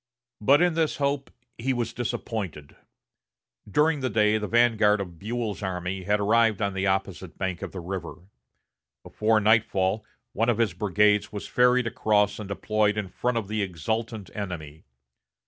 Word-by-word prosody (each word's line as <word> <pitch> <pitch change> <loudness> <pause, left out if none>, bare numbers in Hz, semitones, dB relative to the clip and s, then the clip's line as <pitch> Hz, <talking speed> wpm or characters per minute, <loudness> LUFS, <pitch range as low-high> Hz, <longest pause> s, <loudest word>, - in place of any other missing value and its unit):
But 140 +10 +5
in 175 -1 +3
this 160 -1 0
hope 140 -1 -1 0.3
he 130 +3 0
was 120 -2 -2
disappointed. 105 -10 -4 0.9
During 150 +7 +2
the 130 -1 -1
day 105 0 +3
the 105 - -3
vanguard 110 -3 +3
of 90 -4 -6
Buell's 110 0 -3
army 95 0 -3
had 105 0 +2
arrived 110 0 +3
on 100 -2 -1
the 95 +1 -1
opposite 95 -2 -2
bank 95 -2 -3
of - - -5
the 95 - -6
river. 90 -1 -5 0.9
Before 110 0 +1
nightfall 105 -2 +2 0.3
one 115 +3 +1
of 120 - +2
his 115 -7 +1
brigades 105 +2 +2
was 105 -1 -6
ferried 125 0 +3
across 105 -3 +1
and 105 - -6
deployed 105 +1 0
in 100 -3 -3
front 125 +5 -1
of 110 -4 -2
the 110 +1 -2
exultant 110 +4 -3
enemy. 80 -7 -6
105 Hz, 160 wpm, -26 LUFS, 95-115 Hz, 0.9 s, But